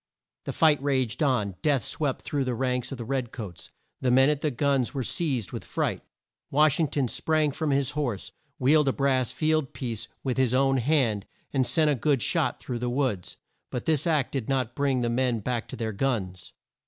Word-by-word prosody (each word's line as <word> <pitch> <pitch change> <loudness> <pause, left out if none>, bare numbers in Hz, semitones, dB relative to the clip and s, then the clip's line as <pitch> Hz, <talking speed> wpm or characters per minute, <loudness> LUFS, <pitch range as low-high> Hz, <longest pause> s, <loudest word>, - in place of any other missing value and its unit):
The - - -2
fight 155 -4 +3
raged 130 -2 0
on. 105 - +1
Death 145 -5 +2
swept 145 -4 -2
through 145 -2 -1
the 125 -1 -1
ranks 125 +1 -1
of 135 - -5
the 120 - -6
red 130 -1 -2
coats. 100 -8 -8 0.3
The 130 - 0
men 130 +3 +5
at 150 -1 -2
the 155 - +1
guns 140 0 0
were 135 - -1
seized 130 - -1
with - - -5
fright. - - -2 0.5
Wash 150 +1 +3
ing 160 - +3
ton 140 -2 0
sprang 155 +4 +1
from 155 +2 -2
his 140 -2 +2
horse, 125 -10 -3 0.3
wheeled 150 +3 +4
a 135 - +3
brass 130 -3 +1
field 155 -3 0
piece 115 -5 -4 0.2
with 130 -2 -1
his 130 -2 +2
own 135 0 +3
hand, 120 -6 +1 0.3
and 130 -3 +2
sent 150 +4 +3
a - - +3
good 140 -1 +1
shot - - 0
through 120 -2 -4
the 125 +1 -1
woods. 120 -8 -1 0.3
But 125 - -4
this 155 -1 +1
act 150 -5 +1
did 135 -4 -3
not 130 -3 0
bring 135 -2 +1
the 120 - 0
men 125 -1 +1
back 120 +2 -2
to - - -7
their 110 -2 -3
guns. 100 -7 -2
130 Hz, 205 wpm, -27 LUFS, 120-145 Hz, 0.5 s, men